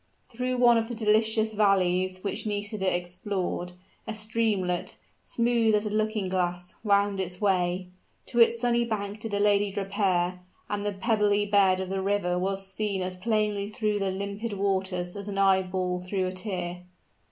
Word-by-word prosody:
Through 250 Hz, +1 st, -2 dB
one 240 Hz, -1 st, +6 dB
of 225 Hz, -, -2 dB
the 240 Hz, -, -5 dB
delicious 220 Hz, 0 st, +2 dB
valleys 185 Hz, -3 st, +2 dB
which 205 Hz, -, -3 dB
Nisida 205 Hz, -2 st, -1 dB
explored, 180 Hz, 0 st, -3 dB, 0.3 s
a 220 Hz, -, -3 dB
streamlet, 215 Hz, -5 st, -1 dB, 0.2 s
smooth 235 Hz, -2 st, +2 dB
as 210 Hz, +1 st, 0 dB
a 210 Hz, -, -2 dB
looking 215 Hz, -2 st, 0 dB
glass, 180 Hz, -1 st, -2 dB
wound 200 Hz, -1 st, +2 dB
its 180 Hz, -1 st, -3 dB
way. 180 Hz, -2 st, +1 dB, 0.4 s
To 240 Hz, -, -2 dB
its 235 Hz, 0 st, +6 dB
sunny 240 Hz, 0 st, +2 dB
bank 210 Hz, -2 st, -3 dB
did 225 Hz, -, -5 dB
the 205 Hz, -1 st, -1 dB
lady 205 Hz, 0 st, +3 dB
repair; 190 Hz, -3 st, 0 dB, 0.3 s
and 205 Hz, -1 st, -3 dB
the 205 Hz, -, -1 dB
pebbly 210 Hz, -1 st, +2 dB
bed 200 Hz, -2 st, +4 dB
of 190 Hz, -1 st, -4 dB
the 195 Hz, 0 st, -1 dB
river 190 Hz, -3 st, 0 dB
was 195 Hz, +1 st, -1 dB
seen 195 Hz, -1 st, -2 dB
as 185 Hz, 0 st, -3 dB
plainly 210 Hz, 0 st, 0 dB
through 215 Hz, -2 st, -1 dB
the 195 Hz, -1 st, 0 dB
limpid 200 Hz, +3 st, -4 dB
waters 190 Hz, -2 st, -1 dB
as 200 Hz, 0 st, -5 dB
an 200 Hz, -1 st, -4 dB
eyeball 185 Hz, -2 st, +2 dB
through 185 Hz, +1 st, -2 dB
a 185 Hz, -, -3 dB
tear. 180 Hz, -2 st, -4 dB
200 Hz, 165 wpm, -27 LUFS, 185-215 Hz, 0.4 s, one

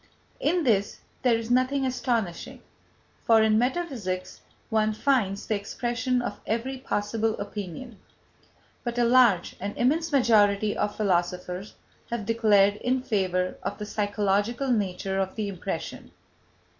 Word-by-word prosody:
In 340 Hz, +3 st, +1 dB
this 205 Hz, -6 st, +1 dB, 0.2 s
there 245 Hz, -3 st, +3 dB
is 230 Hz, +1 st, -5 dB
nothing 255 Hz, +2 st, +2 dB
astonishing, 235 Hz, -8 st, -2 dB, 0.6 s
for 225 Hz, -1 st, +5 dB
in 215 Hz, 0 st, +4 dB
metaphysics 245 Hz, -, -2 dB, 0.3 s
one 215 Hz, -1 st, +2 dB
finds 215 Hz, -5 st, +1 dB
the -, -, -1 dB
expression 240 Hz, +4 st, -1 dB
of -, -, -5 dB
every 255 Hz, +4 st, -2 dB
possible 220 Hz, -1 st, -1 dB
opinion. 205 Hz, +3 st, -7 dB, 0.8 s
But 240 Hz, 0 st, -3 dB
a 240 Hz, -, +3 dB
large, 235 Hz, -7 st, +4 dB
an 200 Hz, +2 st, -4 dB
immense 315 Hz, +6 st, +1 dB
majority 215 Hz, -6 st, +3 dB
of 210 Hz, -, -1 dB
philosophers 180 Hz, -1 st, -1 dB, 0.3 s
has 235 Hz, -3 st, -3 dB
declared 205 Hz, -3 st, +4 dB
in 255 Hz, +2 st, -1 dB
favour 185 Hz, -5 st, 0 dB
of -, -, -4 dB
the 210 Hz, -, -5 dB
psychological 205 Hz, +5 st, 0 dB
nature 195 Hz, -3 st, -1 dB
of 190 Hz, -1 st, -2 dB
the 215 Hz, -2 st, -2 dB
impression. 190 Hz, -3 st, -5 dB
220 Hz, 130 wpm, -26 LUFS, 200-245 Hz, 0.8 s, for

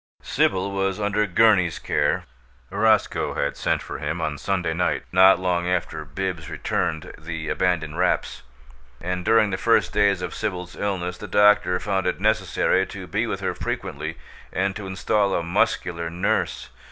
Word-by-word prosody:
Sibyl 95 Hz, +1 st, +1 dB
was 95 Hz, 0 st, -1 dB
under 105 Hz, +1 st, +1 dB
Gurney's 95 Hz, -3 st, +4 dB
care. 75 Hz, -, 0 dB, 0.5 s
Roscoe 110 Hz, +2 st, +2 dB
had 70 Hz, -, -1 dB
sent -, -, -1 dB
for -, -, -6 dB
him 80 Hz, +4 st, -3 dB
on 75 Hz, -3 st, -2 dB
Sunday 90 Hz, -4 st, -1 dB
night, 90 Hz, +2 st, 0 dB
not 95 Hz, +1 st, +7 dB
long 90 Hz, -1 st, 0 dB
after 85 Hz, -3 st, -1 dB
Bibbs 85 Hz, +2 st, -4 dB
returned 80 Hz, -1 st, -2 dB
the 80 Hz, -1 st, -5 dB
abandoned 85 Hz, -3 st, 0 dB
wraps; 90 Hz, 0 st, 0 dB, 0.6 s
and 90 Hz, +1 st, -3 dB
during 110 Hz, -1 st, +4 dB
the 95 Hz, -, -2 dB
first 100 Hz, -4 st, +2 dB
days 100 Hz, -3 st, +2 dB
of -, -, -4 dB
Sibyl's 90 Hz, -2 st, -4 dB
illness 90 Hz, -3 st, -3 dB
the 105 Hz, -, -7 dB
doctor 105 Hz, -3 st, +4 dB
found 95 Hz, -2 st, -1 dB
it 90 Hz, -, -1 dB
necessary 95 Hz, -2 st, +2 dB
to 95 Hz, -1 st, -8 dB
be -, -, -1 dB
with -, -, -3 dB
her -, -, -1 dB
frequently, 80 Hz, +2 st, -4 dB, 0.3 s
and 95 Hz, +1 st, -1 dB
to 100 Hz, -2 st, -6 dB
install 95 Hz, +1 st, +1 dB
a 85 Hz, -, 0 dB
muscular 85 Hz, 0 st, 0 dB
nurse. 85 Hz, +2 st, -1 dB
90 Hz, 160 wpm, -23 LUFS, 85-100 Hz, 0.6 s, not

